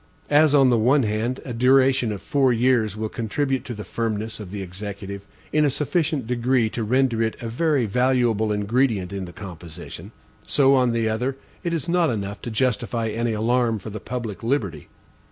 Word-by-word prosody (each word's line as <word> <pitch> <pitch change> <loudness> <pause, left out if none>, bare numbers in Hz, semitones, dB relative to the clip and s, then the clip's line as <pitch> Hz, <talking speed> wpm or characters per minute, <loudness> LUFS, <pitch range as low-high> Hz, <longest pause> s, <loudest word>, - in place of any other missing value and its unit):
As, 150 0 +5
on 135 -3 +5
the 120 - +3
one 130 +5 +4
hand, 110 +4 -1
a 125 - -5
duration 130 0 +4
of 100 - -6
four 135 -3 +2
years 115 -3 +2
will 110 0 -2
contribute 130 +4 -2
to 120 - -5
the 105 - -6
firmness 110 -1 -3
of 105 -4 -8
the 100 0 -5
Executive 100 +1 -7 0.3
in 155 - +4
a 145 - +4
sufficient 150 -1 -1
degree 120 -1 +1
to 115 - -3
render 125 0 +2
it 110 -1 0
a 115 - -5
very 140 +2 +1
valuable 120 -1 +2
ingredient 105 -2 0
in 95 -1 -4
the 85 - -9
composition; 85 -4 -9 0.3
so, 140 -2 +3
on 125 -2 +3
the 115 -1 0
other, 125 +5 -1 0.3
it 170 - -1
is 165 -2 -2
not 170 -1 +2
enough 100 -3 -4
to - - -5
justify 115 -1 0
any 115 +1 -1
alarm 115 +1 +1
for 105 +1 -8
the 110 - -5
public 115 -3 -5
liberty. 115 - -2
115 Hz, 190 wpm, -23 LUFS, 105-130 Hz, 0.3 s, As